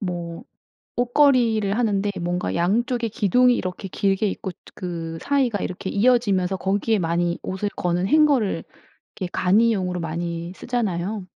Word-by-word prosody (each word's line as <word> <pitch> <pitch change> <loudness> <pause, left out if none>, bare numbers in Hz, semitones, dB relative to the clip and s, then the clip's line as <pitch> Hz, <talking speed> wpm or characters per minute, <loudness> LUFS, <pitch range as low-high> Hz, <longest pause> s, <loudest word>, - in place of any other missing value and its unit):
뭐 175 -3 -5 0.5
옷걸이를 240 -5 +3
하는데 205 -3 +1
뭔가 175 +1 -2
양쪽에 230 +7 +1
기둥이 245 +4 +3
이렇게 185 +1 -4
길게 195 +2 0
있고 190 -1 -4
저 - - -38 0.2
그 165 -3 -5
사이가 260 -7 +1
이렇게 185 +1 -4
이어지면서 200 -5 +2
거기에 200 +3 0
많이 170 0 0
옷을 190 +2 -2
거는 180 0 -1
hanger를 285 -6 +3 0.5
이렇게 185 -3 -4
간이용으로 185 -2 +2
많이 170 +1 -4
쓰잖아요. 210 -4 -2
195 Hz, 345 characters per minute, -23 LUFS, 175-230 Hz, 0.5 s, 옷걸이를